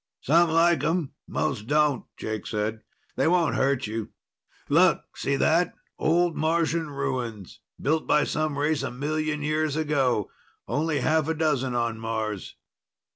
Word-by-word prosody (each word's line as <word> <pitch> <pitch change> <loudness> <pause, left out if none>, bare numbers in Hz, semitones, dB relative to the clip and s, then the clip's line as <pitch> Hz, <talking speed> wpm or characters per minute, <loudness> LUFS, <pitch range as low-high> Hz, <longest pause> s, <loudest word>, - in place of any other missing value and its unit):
"Some 165 +4 +4
like 165 -2 +3
'em, 165 -2 0 0.2
most 105 - -2
don't," 150 -3 +2
Jake 110 -1 -4
said. 110 0 -2 0.4
"They - - +2
won't 170 -2 +3
hurt 135 -1 +1
you. 110 0 -4 0.6
Look - - +4
see 140 +1 -1
that? 165 +5 +2 0.2
Old 170 +1 +2
Martian 165 0 0
ruins. 130 -8 -4 0.2
Built 155 +3 0
by 150 - +4
some 155 -2 -1
race 150 +1 +1
a - - -2
million 150 +3 -2
years 155 0 0
ago. 135 -9 +1 0.4
Only 150 -1 0
half 155 +2 +2
a 160 - 0
dozen 135 -5 0
on 115 -2 -1
Mars." 110 -3 -4
150 Hz, 140 wpm, -26 LUFS, 125-160 Hz, 0.6 s, Some